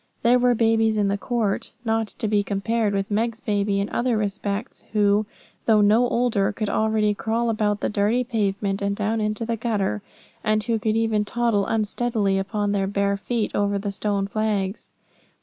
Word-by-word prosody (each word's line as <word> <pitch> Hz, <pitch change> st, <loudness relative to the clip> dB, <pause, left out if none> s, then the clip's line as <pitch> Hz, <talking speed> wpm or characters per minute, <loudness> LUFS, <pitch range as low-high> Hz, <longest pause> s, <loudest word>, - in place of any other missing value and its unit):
There 245 Hz, +2 st, +5 dB
were 245 Hz, 0 st, +3 dB
babies 225 Hz, -1 st, +2 dB
in 205 Hz, -1 st, +2 dB
the 200 Hz, -, +1 dB
court, 225 Hz, -5 st, -1 dB
not 225 Hz, -1 st, +1 dB
to 220 Hz, -, -2 dB
be 205 Hz, -1 st, +2 dB
compared 205 Hz, +2 st, 0 dB
with 195 Hz, +1 st, -2 dB
Meg's 225 Hz, +2 st, 0 dB
baby 205 Hz, -3 st, 0 dB
in 200 Hz, -, -1 dB
other 240 Hz, -2 st, +1 dB
respects, 205 Hz, +2 st, -3 dB
who, 205 Hz, 0 st, +3 dB, 0.4 s
though 215 Hz, -2 st, +5 dB
no 220 Hz, +4 st, +4 dB
older, 235 Hz, -5 st, +1 dB
could 215 Hz, -2 st, -3 dB
already 220 Hz, -1 st, +1 dB
crawl 225 Hz, +3 st, -1 dB
about 210 Hz, -1 st, 0 dB
the -, -, +1 dB
dirty 210 Hz, +4 st, +1 dB
pavement 200 Hz, -4 st, -1 dB
and 200 Hz, 0 st, 0 dB
down 215 Hz, +2 st, -1 dB
into 215 Hz, +2 st, -1 dB
the 230 Hz, 0 st, -2 dB
gutter, 215 Hz, -3 st, -1 dB, 0.4 s
and 215 Hz, -1 st, +1 dB
who 225 Hz, +1 st, 0 dB
could 215 Hz, +1 st, 0 dB
even 225 Hz, -2 st, +1 dB
toddle 220 Hz, -2 st, 0 dB
unsteadily, 215 Hz, -2 st, 0 dB
upon 205 Hz, +1 st, -1 dB
their 195 Hz, -1 st, 0 dB
little 200 Hz, -, -6 dB
bare 200 Hz, 0 st, +1 dB
feet, 220 Hz, +2 st, -2 dB
over 205 Hz, 0 st, +1 dB
the 200 Hz, 0 st, -3 dB
stone 200 Hz, 0 st, -1 dB
flags. 205 Hz, -1 st, -2 dB
215 Hz, 185 wpm, -23 LUFS, 200-225 Hz, 0.4 s, There